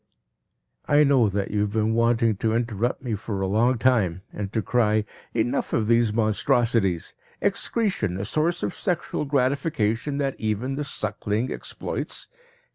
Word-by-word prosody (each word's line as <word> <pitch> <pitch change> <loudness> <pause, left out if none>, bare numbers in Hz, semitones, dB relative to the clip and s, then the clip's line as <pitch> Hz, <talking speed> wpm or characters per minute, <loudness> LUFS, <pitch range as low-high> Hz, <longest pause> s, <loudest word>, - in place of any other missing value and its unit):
I 145 +1 +5
know 135 -6 +4
that 100 0 -2
you 105 - 0
have 105 0 0
been 110 0 +1
wanting 115 -1 +2
to 110 +2 0
interrupt 120 +2 -1
me 120 -4 -2
for 105 -1 -4
a 95 - 0
long 115 +6 +2
time 100 -8 +2
and 100 -1 -4
to 110 -2 -1
cry: 110 -3 +2 0.3
"Enough 115 +1 0
of 110 -2 +1
these 115 -1 +3
monstrosities! 110 -3 +1 0.3
Excretion 185 - 0
a 100 - -3
source 160 +9 0
of - - -1
sexual 175 -5 -2
gratification 140 -2 0
that 135 -2 0
even 110 +5 -1
the 145 +2 -2
suckling 105 -1 -1
exploits! - - -4
115 Hz, 150 wpm, -25 LUFS, 105-130 Hz, 0.3 s, I